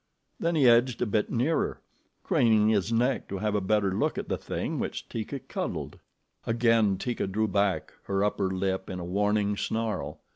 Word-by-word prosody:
Then 170 Hz, 0 st, 0 dB
he 140 Hz, -5 st, +5 dB
edged 120 Hz, +1 st, +4 dB
a -, -, +1 dB
bit 105 Hz, -1 st, 0 dB
nearer, 130 Hz, +7 st, 0 dB, 0.4 s
craning 110 Hz, -2 st, +3 dB
his 105 Hz, -1 st, +1 dB
neck 125 Hz, +3 st, +1 dB
to 100 Hz, -, -4 dB
have 105 Hz, +2 st, -1 dB
a 105 Hz, -, +1 dB
better 100 Hz, 0 st, +1 dB
look -, -, 0 dB
at -, -, -4 dB
the -, -, 0 dB
thing -, -, -3 dB
which -, -, -4 dB
Teeka 115 Hz, +5 st, -4 dB
cuddled. -, -, -4 dB, 0.5 s
Again 115 Hz, -4 st, +3 dB
Teeka 120 Hz, +1 st, -2 dB
drew 110 Hz, +3 st, 0 dB
back 100 Hz, -1 st, 0 dB
her 100 Hz, 0 st, 0 dB
upper 100 Hz, -2 st, 0 dB
lip 95 Hz, 0 st, -2 dB
in 90 Hz, -, -4 dB
a 85 Hz, -, -5 dB
warning 105 Hz, +2 st, +1 dB
snarl. 110 Hz, +1 st, -2 dB
105 Hz, 180 wpm, -28 LUFS, 100-115 Hz, 0.5 s, he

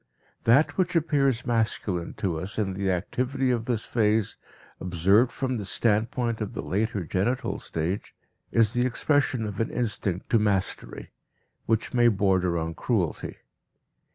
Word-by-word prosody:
That 135 Hz, +11 st, +4 dB
which 180 Hz, -1 st, +1 dB
appears 140 Hz, -7 st, +2 dB
masculine 110 Hz, -6 st, -1 dB
to 85 Hz, -5 st, -2 dB
us 95 Hz, +5 st, -6 dB
in 100 Hz, -3 st, 0 dB
the 95 Hz, 0 st, -1 dB
activity 125 Hz, +8 st, -1 dB
of 115 Hz, -2 st, -1 dB
this 115 Hz, -3 st, -1 dB
phase, 110 Hz, -2 st, +1 dB, 0.4 s
observed 95 Hz, +7 st, +3 dB
from 130 Hz, -2 st, -2 dB
the 105 Hz, -, -4 dB
standpoint 115 Hz, +3 st, 0 dB
of 105 Hz, -, -3 dB
the -, -, -4 dB
later 105 Hz, -1 st, -1 dB
genital 100 Hz, +10 st, -1 dB
stage, 85 Hz, +5 st, -4 dB, 0.4 s
is 115 Hz, -2 st, +3 dB
the 120 Hz, -, +1 dB
expression 130 Hz, -2 st, +1 dB
of 105 Hz, -2 st, -5 dB
an 115 Hz, -, 0 dB
instinct 105 Hz, -6 st, -2 dB
to 115 Hz, -, +5 dB
mastery, 100 Hz, -3 st, -2 dB, 0.6 s
which 110 Hz, 0 st, 0 dB
may 120 Hz, -1 st, +5 dB
border 95 Hz, -4 st, +2 dB
on 80 Hz, 0 st, -2 dB
cruelty. 95 Hz, -4 st, -2 dB
110 Hz, 145 wpm, -26 LUFS, 95-120 Hz, 0.6 s, to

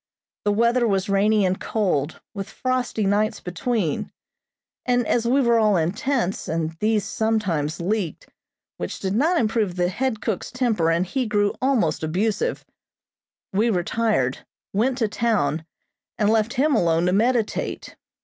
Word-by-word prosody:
The 205 Hz, -, +3 dB
weather 235 Hz, +3 st, +3 dB
was 195 Hz, -2 st, 0 dB
rainy 205 Hz, +1 st, +3 dB
and 185 Hz, 0 st, 0 dB
cold, 170 Hz, -9 st, -1 dB
with 200 Hz, -1 st, -5 dB
frosty 255 Hz, -4 st, -1 dB
nights 210 Hz, +2 st, +1 dB
between, 180 Hz, -, -2 dB, 0.7 s
and 245 Hz, -1 st, +1 dB
as 235 Hz, +1 st, +1 dB
we 265 Hz, +3 st, +3 dB
were 235 Hz, -2 st, +3 dB
all 210 Hz, -3 st, +3 dB
in 165 Hz, +1 st, +1 dB
tents, 235 Hz, -3 st, -1 dB
and 160 Hz, 0 st, -1 dB
these 215 Hz, -1 st, +1 dB
sometimes 190 Hz, -9 st, -1 dB
leaked, 185 Hz, -2 st, -2 dB, 0.5 s
which 90 Hz, -, -5 dB
did 190 Hz, -1 st, -2 dB
not 320 Hz, -, +2 dB
improve 215 Hz, -5 st, 0 dB
the 175 Hz, -1 st, +1 dB
head 225 Hz, +3 st, -1 dB
cook's 210 Hz, -3 st, -3 dB
temper 235 Hz, -10 st, +1 dB
and 170 Hz, +2 st, +2 dB
he 255 Hz, +6 st, -2 dB
grew 205 Hz, -1 st, +1 dB
almost 245 Hz, -, +1 dB
abusive; 205 Hz, -, -1 dB, 0.9 s
we 215 Hz, +5 st, +2 dB
retired, 180 Hz, -, 0 dB, 0.3 s
went 245 Hz, +6 st, +1 dB
to 230 Hz, -4 st, +1 dB
town, 185 Hz, -9 st, 0 dB, 0.5 s
and 210 Hz, 0 st, +2 dB
left 225 Hz, +1 st, +1 dB
him 290 Hz, +4 st, +2 dB
alone 170 Hz, -4 st, +2 dB
to 180 Hz, -, +2 dB
meditate. 230 Hz, +2 st, 0 dB
210 Hz, 150 wpm, -23 LUFS, 180-235 Hz, 0.9 s, The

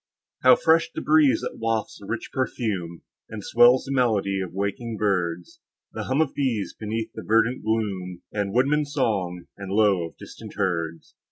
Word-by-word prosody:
How 130 Hz, -1 st, +7 dB
fresh 165 Hz, +3 st, +3 dB
the -, -, -5 dB
breeze 150 Hz, -3 st, +4 dB
that -, -, -5 dB
wafts 115 Hz, -1 st, -2 dB
the 100 Hz, -, -12 dB
rich 115 Hz, -, -4 dB
perfume, 105 Hz, -10 st, -3 dB, 0.3 s
And 110 Hz, -2 st, -7 dB
swells 120 Hz, +4 st, +5 dB
the 135 Hz, -, -5 dB
melody 105 Hz, -7 st, +1 dB
of 95 Hz, -, -5 dB
waking 100 Hz, +4 st, -3 dB
birds; 95 Hz, -, -1 dB, 0.3 s
The 110 Hz, -1 st, -4 dB
hum 135 Hz, +4 st, +1 dB
of 155 Hz, -, 0 dB
bees, 120 Hz, -8 st, -1 dB
beneath 110 Hz, +1 st, -4 dB
the 110 Hz, -, -7 dB
verdant 115 Hz, +4 st, +2 dB
gloom, 95 Hz, -5 st, -2 dB
And 100 Hz, -2 st, -1 dB
woodman's 145 Hz, +5 st, +1 dB
song, 95 Hz, -, -1 dB
and 95 Hz, -1 st, -6 dB
low 100 Hz, -3 st, +3 dB
of -, -, -18 dB
distant 110 Hz, -2 st, -11 dB
herds! 85 Hz, -5 st, -2 dB
110 Hz, 170 wpm, -24 LUFS, 95-125 Hz, 0.3 s, How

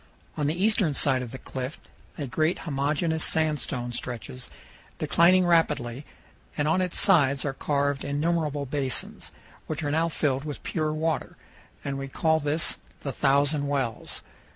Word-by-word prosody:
On 145 Hz, -2 st, 0 dB
the 160 Hz, +4 st, -1 dB
eastern 205 Hz, -, +2 dB
side 130 Hz, -1 st, +3 dB
of 125 Hz, -, -5 dB
the 130 Hz, -, -7 dB
cliff 130 Hz, +2 st, -6 dB, 0.4 s
a 145 Hz, -, -3 dB
great 155 Hz, +7 st, +1 dB
homogeneous 155 Hz, +2 st, 0 dB
sandstone 150 Hz, -6 st, 0 dB
stretches, 125 Hz, +1 st, -5 dB, 0.5 s
declining 180 Hz, +2 st, +4 dB
rapidly, 150 Hz, -6 st, +1 dB, 0.5 s
and 145 Hz, 0 st, +1 dB
on 165 Hz, +4 st, +3 dB
its 180 Hz, -2 st, 0 dB
sides 140 Hz, -8 st, +4 dB
are 140 Hz, -, -1 dB
carved 140 Hz, 0 st, 0 dB
innumerable 150 Hz, 0 st, 0 dB
basins, 135 Hz, -1 st, -2 dB, 0.4 s
which -, -, -3 dB
are 145 Hz, -, -1 dB
now 165 Hz, +2 st, +2 dB
filled 140 Hz, -4 st, 0 dB
with 150 Hz, -2 st, -6 dB
pure 155 Hz, -2 st, -1 dB
water, 160 Hz, +1 st, -2 dB, 0.5 s
and 135 Hz, -1 st, -2 dB
we 135 Hz, -, -4 dB
call 160 Hz, +3 st, +2 dB
this 150 Hz, +2 st, +1 dB, 0.2 s
the 140 Hz, -, -3 dB
Thousand 140 Hz, +2 st, +2 dB
Wells. 135 Hz, -5 st, -2 dB
145 Hz, 150 wpm, -27 LUFS, 135-160 Hz, 0.5 s, declining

